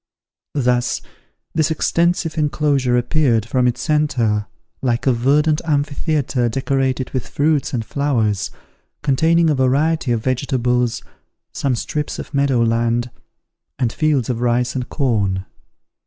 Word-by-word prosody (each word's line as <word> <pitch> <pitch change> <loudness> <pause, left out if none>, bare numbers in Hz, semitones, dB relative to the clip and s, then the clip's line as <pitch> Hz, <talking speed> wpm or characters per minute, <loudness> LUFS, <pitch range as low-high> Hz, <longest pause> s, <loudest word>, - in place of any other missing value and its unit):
Thus 125 -3 +1 0.5
this 155 -2 +1
extensive 170 +1 +1
enclosure 145 -5 +1
appeared, 120 -3 +1
from 125 +1 +1
its 125 0 -1
centre, 130 -10 +1 0.3
like 120 -2 0
a 130 - +4
verdant 150 +6 +2
amphitheatre 145 -4 0
decorated 130 +1 -1
with 130 -3 -3
fruits 150 -1 +1
and 115 -4 -2
flowers, 115 -9 0 0.5
containing 160 +4 +3
a - - +3
variety 140 +2 +1
of 115 -2 0
vegetables, 125 -2 0 0.5
some 135 -3 0
strips 150 +5 -3
of - - -8
meadow 140 -4 +2
land, 115 +1 0 0.7
and 120 -3 0
fields 150 -6 +1
of 120 -2 -2
rice 120 0 +1
and 125 -2 -4
corn. 100 -9 0
130 Hz, 125 wpm, -19 LUFS, 120-150 Hz, 0.7 s, a